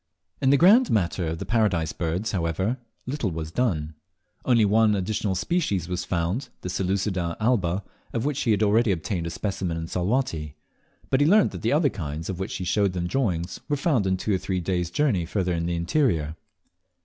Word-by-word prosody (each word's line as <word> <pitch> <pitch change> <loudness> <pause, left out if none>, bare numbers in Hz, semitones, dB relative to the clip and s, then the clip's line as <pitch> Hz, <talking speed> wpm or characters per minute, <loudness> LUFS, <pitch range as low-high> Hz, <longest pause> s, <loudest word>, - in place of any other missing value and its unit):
In 135 - +3
the 140 - +6
grand 215 - +6
matter 90 -4 0
of 80 +1 -2
the - - -5
Paradise 100 -9 +1
Birds, 90 +6 -2
however, 95 - -1 0.3
little 130 -5 -2
was 80 -2 -5
done. 80 -10 -1 0.5
Only 115 -4 +4
one 105 +1 +4
additional 100 0 -1
species 100 - 0
was 90 -1 -3
found, 90 +10 -1
the 90 - -4
Seleucides 95 -2 -1
alba, 100 -5 +1 0.3
of 115 +1 -2
which 145 -2 -1
he 120 - 0
had 105 0 +3
already 110 +2 +3
obtained 85 0 -2
a - - -2
specimen 90 -1 -3
in 80 - -3
Salwatty; 90 - -1 0.6
but 130 - +3
he 145 - +5
learnt 205 +4 +5
that - - -7
the 115 - +1
other 150 0 +3
kinds' 80 -1 -4
of 90 - -6
which 95 +2 -3
he 95 - -4
showed 100 +1 +1
them 90 -1 -2
drawings, 90 -6 -1
were 145 - +1
found 115 - +1
two 105 +2 -1
or 95 - +1
three 95 0 -2
days' 90 -1 -1
journey 110 - +1
farther 90 +1 -1
in 85 0 -1
the 85 - -1
interior. 85 - +1
95 Hz, 195 wpm, -25 LUFS, 85-115 Hz, 0.6 s, the